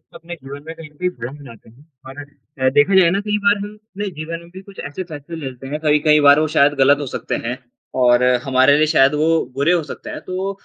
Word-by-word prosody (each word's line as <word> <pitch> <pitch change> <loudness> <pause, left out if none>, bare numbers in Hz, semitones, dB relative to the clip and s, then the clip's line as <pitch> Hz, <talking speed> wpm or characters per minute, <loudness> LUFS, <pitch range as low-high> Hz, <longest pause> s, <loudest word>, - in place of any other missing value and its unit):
अपने 175 +1 -9
जीवन 140 +2 -10
में 160 - -6
कहीं 160 -2 -11
न - - -27
कहीं 180 0 -1
भ्रम 125 +5 -7
लाते 115 -1 -15
हैं, 130 +7 -21 0.2
और 135 +2 -10
अ, 130 -2 -4
देखा 185 +7 +4
जाए 170 - +4
ना 195 - 0
कई 210 0 +1
बार 205 - +4
हम 205 +1 -8
अपने 210 -1 -7
जीवन 165 +2 -5
में 170 0 -16
भी 190 - -9
कुछ 195 0 -15
ऐसे 165 +6 -6
फैसले 160 -1 -9
ले 155 -4 -7
लेते 130 +1 -11
हैं, 150 +3 -4
कई-कई 150 0 +3
बार 145 +1 +7
वो 155 - +1
शायद 145 0 +5
गलत 145 +2 +4
हो 145 - -4
सकते - - -3
हैं 125 +2 -3 0.4
और 120 0 +4 0.2
हमारे 130 +1 +4
लिए 155 - +3
शायद 140 -2 +4
वो 155 +2 +1 0.2
बुरे 140 +6 +1
हो 170 -3 +1
सकते - - -9
हैं। - - -6
तो 185 +2 -4
150 Hz, 255 wpm, -19 LUFS, 135-175 Hz, 0.4 s, बार